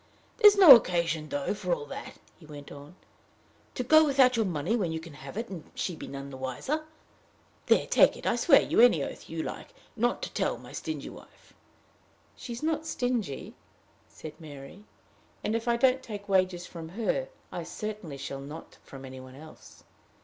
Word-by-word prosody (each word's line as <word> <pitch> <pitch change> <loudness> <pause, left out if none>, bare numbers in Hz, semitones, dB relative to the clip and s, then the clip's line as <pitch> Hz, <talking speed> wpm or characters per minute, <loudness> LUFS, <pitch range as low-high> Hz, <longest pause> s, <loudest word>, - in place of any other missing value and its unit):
"There's 420 -3 +7
no 345 -9 +12
occasion, 170 -7 0
though, 145 +4 -2
for 355 - -1
all 465 -2 -8
that," - - -8 0.2
he 160 - -16
went 145 -2 -11
on, 145 +4 -12 0.8
"to 250 - -2
go 315 +5 +6
without 270 -4 +4
your 225 -3 +1
money 170 +5 -1
when 190 -8 -1
you 160 - -3
can 165 -1 -11
have 140 +4 -10
it 230 +1 -3
and 180 -5 -9
she 180 - -3
be - - -9
nothing 140 0 -7
the 130 - -8
wiser. 130 - -3 0.8
There - - +4
take - - +4
it. - - -11
I - - +3
will - - -1
swear 280 -6 +6
you - - 0
any 205 - +5
oath - - -8
you 165 0 -4
like - - -8 0.2
not 240 +1 0
to - - -5
tell - - -1
my - - -13
stingy - - -5
wife." - - -17 0.8
"She 245 - -9
is 235 +4 -6
not 320 0 -1
stingy," 240 - -2 0.5
said 155 - -10
Mary; 150 +5 -11 0.6
"and, 215 - -1
if 230 +1 -3
I 235 0 +2
don't 260 +1 +3
take 205 -4 -8
wages 185 -2 +1
from 165 -3 -9
her, 235 - -2 0.2
I - - -4
certainly 210 -9 -6
shall 135 0 -6
not 150 +4 -10
from 135 -1 -11
any 130 0 -9
one 130 0 -12
else. 155 +3 -14
185 Hz, 195 wpm, -28 LUFS, 150-245 Hz, 0.8 s, no